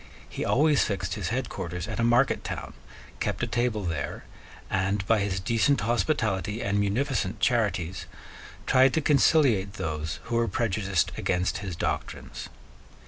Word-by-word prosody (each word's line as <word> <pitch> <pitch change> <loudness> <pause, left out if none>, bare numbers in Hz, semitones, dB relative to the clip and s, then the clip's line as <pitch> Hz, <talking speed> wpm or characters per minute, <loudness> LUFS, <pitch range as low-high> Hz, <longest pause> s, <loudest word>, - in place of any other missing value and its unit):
He - - -5
always 150 +1 +3
fixed 95 -3 -2
his 100 -4 -3
headquarters 95 -8 -3
at - - -5
a - - +2
market 120 +3 +3
town, - - -5 0.5
kept - - -2
a - - +4
table 120 -3 -1
there, 80 -5 -3 0.4
and, 95 +1 0
by 110 +1 +3
his 100 -2 -1
decent 115 +7 +2
hospitality 110 -4 0
and 100 -4 0
munificent 105 0 0
charities, 95 -7 0 0.6
tried 130 +1 +4
to 160 - +2
conciliate 135 - +3
those 80 +1 -4
who 115 0 -2
were 115 0 +2
prejudiced 95 -8 0
against 90 +1 0
his 95 -4 -5
doctrines. - - -4
105 Hz, 140 wpm, -27 LUFS, 95-120 Hz, 0.6 s, a